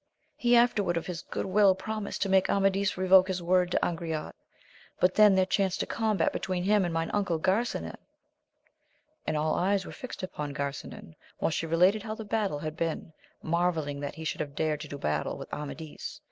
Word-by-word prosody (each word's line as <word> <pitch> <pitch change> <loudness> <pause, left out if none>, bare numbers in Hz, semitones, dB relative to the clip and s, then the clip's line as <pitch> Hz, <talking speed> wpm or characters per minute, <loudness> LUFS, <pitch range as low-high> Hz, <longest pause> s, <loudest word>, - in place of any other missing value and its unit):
He 240 0 +3
afterward 210 -7 +3
of 165 - -3
his 180 -2 -5
good - - -4
will 195 0 +4
promised 210 +2 -3
to 200 - -2
make 190 0 +3
Amadis 195 0 +2
revoke 185 0 +6
his 185 -2 -3
word 180 +1 +3
to - - +1
Angriote: 165 -2 -3 0.7
but 180 0 +3
then 210 -2 +6
there 190 0 +4
chanced 190 -1 0
a - - -4
combat 220 -3 0
between 185 -1 -2
him 205 +1 +3
and 175 - -1
mine 165 0 -1
Uncle 195 -5 +1
Garsinan; 190 +8 -1 1.3
and 155 - 0
all 155 +1 +1
eyes 195 +1 +1
were - - -8
fixed 255 - -8
upon 150 -6 -5
Garsinan 145 +7 -5 0.2
while - - 0
she 165 +1 -2
related 180 +6 +3
how 215 0 -5
the 220 - -7
battle 205 -6 -1
had 155 +1 -5
been, 165 -1 -3 0.3
marvelling 160 -4 0
that 145 0 -5
he 160 - -7
should 155 - -2
have 145 -2 -5
dared 155 -2 0
do 145 - -7
battle 75 - -2
with - - -9
Amadis. 150 +1 -6
185 Hz, 190 wpm, -29 LUFS, 160-200 Hz, 1.3 s, revoke